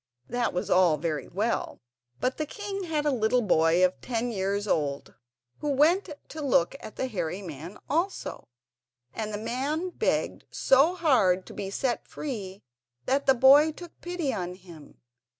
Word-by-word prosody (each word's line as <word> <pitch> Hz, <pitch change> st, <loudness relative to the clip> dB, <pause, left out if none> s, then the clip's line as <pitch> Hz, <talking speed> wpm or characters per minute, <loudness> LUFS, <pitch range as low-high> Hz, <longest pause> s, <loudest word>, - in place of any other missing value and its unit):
That 245 Hz, 0 st, 0 dB
was 180 Hz, -, -3 dB
all 180 Hz, -4 st, +5 dB
very 155 Hz, -1 st, -3 dB
well; 215 Hz, +6 st, -2 dB, 0.4 s
but 255 Hz, -, -1 dB
the 310 Hz, -, -2 dB
king 395 Hz, +1 st, -5 dB
had 305 Hz, -3 st, -1 dB
a 295 Hz, -, +3 dB
little 245 Hz, 0 st, +2 dB
boy 170 Hz, -1 st, +4 dB
of 185 Hz, -, -2 dB
ten 240 Hz, 0 st, -2 dB
years 200 Hz, 0 st, -1 dB
old 145 Hz, -6 st, -1 dB, 0.5 s
who 295 Hz, -, -2 dB
went 320 Hz, +8 st, +3 dB, 0.2 s
to 310 Hz, -, -7 dB
look 255 Hz, -, +2 dB
at 215 Hz, -, -10 dB
the -, -, -2 dB
hairy 190 Hz, -5 st, -3 dB
man 165 Hz, +3 st, -8 dB
also, 340 Hz, -, -2 dB, 0.7 s
and 215 Hz, -1 st, -4 dB
the 205 Hz, -, -3 dB
man 275 Hz, -, -2 dB
begged -, -, -1 dB
so 280 Hz, +7 st, +4 dB
hard 220 Hz, -, +3 dB
to -, -, -11 dB
be 195 Hz, -, -5 dB
set 240 Hz, +4 st, -2 dB
free 205 Hz, -9 st, -6 dB, 0.4 s
that 275 Hz, +2 st, +1 dB
the 265 Hz, -, +6 dB
boy 275 Hz, +5 st, +7 dB
took 345 Hz, +2 st, -11 dB
pity 345 Hz, -6 st, -2 dB
on 180 Hz, -1 st, -4 dB
him. 170 Hz, -5 st, -14 dB
235 Hz, 165 wpm, -27 LUFS, 185-295 Hz, 0.7 s, boy